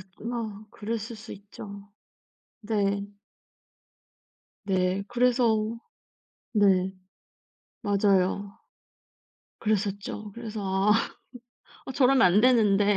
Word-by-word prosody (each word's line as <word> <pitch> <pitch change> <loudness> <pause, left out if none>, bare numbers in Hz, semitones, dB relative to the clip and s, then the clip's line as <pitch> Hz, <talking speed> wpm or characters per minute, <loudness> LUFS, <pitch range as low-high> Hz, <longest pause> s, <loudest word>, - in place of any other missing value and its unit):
긋 - - -13
뭐 220 -3 -4
그랬을 225 +1 -4
수 220 - -11
있죠. 200 0 -10 0.7
네. 200 -2 0 1.6
네, 185 0 +1
그래서 235 -2 +2 0.8
네. 190 -3 +3 0.9
맞아요. 200 -1 +1 1.0
그랬었죠. 205 0 -2
그래서 225 -1 -6
"아. 195 +2 +2 0.9
어, - - -5
저러면 260 0 +4
안 185 +3 +6
되는데." 210 -4 +4
205 Hz, 155 characters per minute, -27 LUFS, 200-225 Hz, 1.6 s, 안